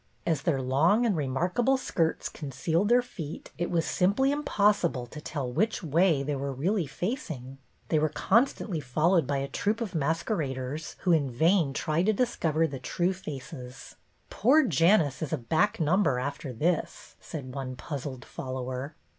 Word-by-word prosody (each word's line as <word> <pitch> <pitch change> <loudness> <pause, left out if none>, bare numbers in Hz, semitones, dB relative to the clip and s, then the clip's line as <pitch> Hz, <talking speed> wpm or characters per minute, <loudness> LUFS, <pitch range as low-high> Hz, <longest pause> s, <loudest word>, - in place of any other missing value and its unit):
As 160 -5 +1
their 140 -2 +1
long 160 - +3
and 215 -5 +2
remarkable 175 - +1
skirts 165 -10 -1
concealed 160 - -1
their 245 +1 +5
feet 165 -10 -8
it 175 - -1
was 165 -2 +1
simply 205 +10 +2
impossible 205 - +1
to 150 +5 -10
tell 140 -5 -4
which 215 - 0
way 160 -1 +3
they 145 +1 -2
were 140 0 -3
really 170 +6 0
facing. 135 - -5 0.3
They 155 - +3
were 155 +1 +2
constantly 220 - +1
followed 155 +4 +2
by 140 -1 0
a 135 0 -2
troop 210 +9 -1
of 220 -5 -4
mas 160 +1 0
queraders 145 - -3
who 180 - +2
in 150 -5 +3
vain 160 +4 +3
tried 160 +7 0
to 220 - +4
discover 165 -9 +1
the 140 -4 -4
true 175 +8 0
faces. 130 -6 -8 0.2
" - - -40
Poor 285 +8 +4
Janus 165 - +3
is 155 - -3
a 160 - +1
back 165 - +1
number 165 -3 +2
after 140 +1 -4
this," 160 +8 -2
said 135 -6 -7
one 130 -2 -5
puzzled 135 -1 -6
follower. 130 +2 -5
160 Hz, 165 wpm, -28 LUFS, 135-190 Hz, 0.3 s, their